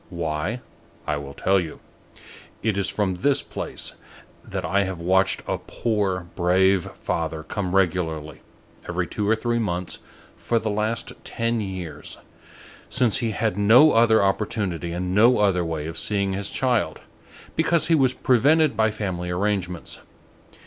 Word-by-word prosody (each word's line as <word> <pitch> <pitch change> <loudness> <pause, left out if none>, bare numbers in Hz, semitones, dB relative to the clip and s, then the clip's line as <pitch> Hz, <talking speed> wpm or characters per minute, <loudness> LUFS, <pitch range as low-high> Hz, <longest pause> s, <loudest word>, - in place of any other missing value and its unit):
Why? 85 +6 -3 0.4
I 75 - 0
will 70 -1 -8
tell 95 +1 +2
you. 85 -4 -6 0.8
It 110 -2 +1
is 100 -1 +1
from 95 -4 -1
this 140 +9 +2
place, - - -4 0.5
that - - -4
I 100 0 +2
have 95 -2 -4
watched 95 +2 +2
a - - -1
poor, 100 -6 -1
brave 95 +1 +3
father 80 -1 -3
come 95 +1 -3
regularly, 80 -5 0 0.5
every 90 0 -1
two 105 +4 -2
or 110 - +5
three 120 +1 -1
months, 90 -5 -3 0.4
for 120 - -1
the 110 -1 -1
last 110 +2 -2
ten 115 0 -1
years, 90 -7 -6 0.7
since 125 -2 +3
he 115 -3 -1
had 110 -2 -1
no 120 +10 +7
other 115 -2 +4
opportunity 95 -4 -1
and 90 +1 -3
no 115 +5 +5
other 95 -4 +2
way 80 -2 -3
of 85 +1 -3
seeing 100 -2 0
his 100 +1 -2
child, 125 -4 0 0.5
because 160 -1 +2
he 165 - +2
was 135 -5 +4
prevented 140 +3 +3
by 110 +1 +3
family 95 -5 -4
arrangements. 90 -3 -2
100 Hz, 150 wpm, -24 LUFS, 90-110 Hz, 0.8 s, no